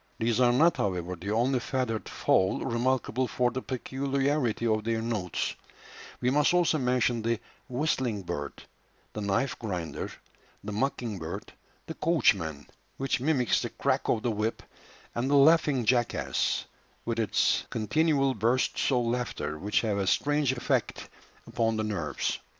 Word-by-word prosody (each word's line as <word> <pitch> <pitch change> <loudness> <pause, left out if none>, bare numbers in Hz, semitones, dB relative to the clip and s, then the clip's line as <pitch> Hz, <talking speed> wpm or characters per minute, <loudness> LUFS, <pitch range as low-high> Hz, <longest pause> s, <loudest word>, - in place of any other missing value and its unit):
These 115 0 +1
are 120 -1 +5
not, 160 +8 +4
however, 90 -2 -2
the 90 +4 -7
only 120 +4 +2
feathered 120 -3 -2
fowl 95 0 +1
remarkable 130 +1 0
for 125 0 +1
the 130 - -3
peculiarity 135 -1 -1
of 110 -1 +1
their 115 0 0
notes; 110 -6 -2 0.7
we 125 0 +1
must 150 +5 +3
also 170 -3 +3
mention 125 -2 +1
the 115 0 0 0.3
"whistling 125 -6 -1
bird," 75 -5 -5 0.5
the 105 - -4
"knife 100 +6 0
grinder," 90 -7 -4 0.5
the 105 - -5
"mocking 115 -2 -2
bird," 80 -1 -6 0.3
the 160 - -6
"coachman," 100 - +1 0.3
which 135 -1 0
mimics 130 -5 +2
the - - -3
crack - - -1
of 110 - +1
the 120 - +1
whip, 110 +1 -2 0.5
and 120 +3 -1
the 145 - +3
"laughing 145 -3 +5
jackass," 120 +1 +1 0.4
with 115 -1 -1
its 110 - +1
continual 135 +4 +1
bursts 120 +5 +1
of 125 -2 +2
laughter, 120 -10 -2
which 105 +4 +1
have 105 -3 -1
a 95 - -1
strange 145 +4 +2
effect 120 -2 -1 0.4
upon 115 -1 0
the 110 - 0
nerves. 95 -9 -2
120 Hz, 145 wpm, -28 LUFS, 105-135 Hz, 0.7 s, are